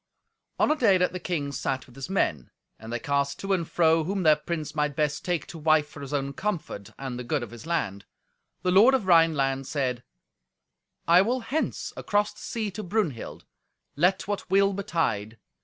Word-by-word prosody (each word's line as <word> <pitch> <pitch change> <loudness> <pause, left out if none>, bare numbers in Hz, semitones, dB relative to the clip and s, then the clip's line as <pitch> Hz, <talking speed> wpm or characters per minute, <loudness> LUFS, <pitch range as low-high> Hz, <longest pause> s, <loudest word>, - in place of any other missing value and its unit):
On - - +3
a - - +3
day 220 -10 +4
that 180 0 +1
the 185 - -4
king 155 -6 -2
sat 130 0 -2
with 125 - -19
his 135 +4 -6
men, 75 - 0 0.3
and 110 +1 -9
they 120 - -1
cast 140 +2 -1
to 195 0 -1
and 170 -4 -1
fro 165 -1 +3
whom 190 +3 -2
their 155 -2 +6
prince 155 0 -4
might 150 -2 -1
best 150 -1 0
take 175 -4 -1
to 165 - -9
wife 155 -1 +3
for 150 - -12
his 140 -1 -7
own 140 -1 -1
comfort 165 - -4
and 130 -2 -5
the - - -4
good 135 +2 -1
of 115 - -8
his 120 +6 -10
land, 100 - -2 0.6
the 180 - +2
lord 220 +8 +7
of 240 -7 -1
Rhineland 145 -6 +3
said, 130 -5 -1 1.1
"I 170 +2 +7
will 245 +6 0
hence 275 +7 -2
across 205 0 0
the - - -16
sea 220 -3 -3
to 210 +3 -6
Brunhild, 180 - -3 0.5
let 180 +8 +2
what 205 -2 -3
will 195 +1 +4
betide. 115 - -2
160 Hz, 195 wpm, -26 LUFS, 135-190 Hz, 1.1 s, lord